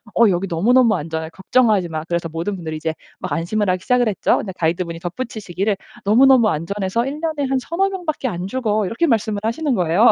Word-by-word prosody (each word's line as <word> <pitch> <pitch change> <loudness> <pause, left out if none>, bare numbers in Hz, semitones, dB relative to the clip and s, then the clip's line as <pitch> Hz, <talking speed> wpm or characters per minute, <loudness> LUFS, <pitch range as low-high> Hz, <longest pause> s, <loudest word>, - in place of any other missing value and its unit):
"어 230 -2 +6
여기 185 +1 0
너무너무 230 +7 +4
안전해. 160 +1 -4
걱정하지 200 0 +2
마." 155 -1 -4
그래서 170 -1 -2
모든 165 +5 -3
분들이 160 -4 -5
이제 160 +1 -2 0.3
막 - - -5
안심을 200 +5 0
하기 185 0 -2
시작을 250 +1 +2
했죠. 210 - +2
근데 200 - -4
가이드분이 170 0 -2
덧붙이시기를 200 0 -3 0.3
"너무너무 245 +2 +6
안전해서 195 +7 -1
1 280 +3 -4
년에 310 -4 -1
한 265 -1 +1
3-4 345 +9 0
명밖에 345 -8 -3
안 180 -2 -4
죽어." 215 -2 0
이렇게 230 - 0
말씀을 220 -5 +1
하시는 265 +6 0
거예요. 180 +4 +4
205 Hz, 465 characters per minute, -20 LUFS, 175-250 Hz, 0.3 s, 어